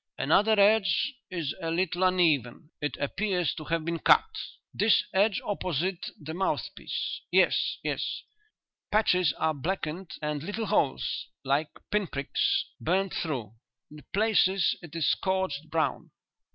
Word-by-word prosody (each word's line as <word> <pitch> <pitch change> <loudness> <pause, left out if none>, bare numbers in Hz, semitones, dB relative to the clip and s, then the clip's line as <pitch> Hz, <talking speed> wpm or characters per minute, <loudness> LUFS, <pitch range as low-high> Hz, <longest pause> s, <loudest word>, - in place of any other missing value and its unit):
"Another 215 0 +3
edge 215 +6 +4 0.2
is 170 -6 -3
a 165 - -2
little 175 +1 0
uneven; 160 -6 +2
it 145 - -2
appears 180 +3 0
to 155 - -8
have 165 -1 -1
been 170 0 -2
cut." - - +5 0.5
"This 215 +1 +4
edge 200 +1 +3
opposite 185 -2 -2
the 155 +1 -7
mouthpiece. 190 +3 -3
Yes, - - +3
yes." - - -2 0.7
"Patches 180 -6 +3
are 160 +3 0
blackened, 165 +3 -3
and 150 -1 -2
little 205 +7 -3
holes 140 -8 0 0.2
like 140 +3 +1 0.2
pinpricks 175 -10 0
burned 190 +3 0
through. 125 - -3 0.4
In 150 -1 -12
places 195 -3 +3
it 170 -1 -11
is 165 - 0
scorched 190 -6 0
brown." 155 -3 -1
175 Hz, 125 wpm, -28 LUFS, 155-195 Hz, 0.7 s, cut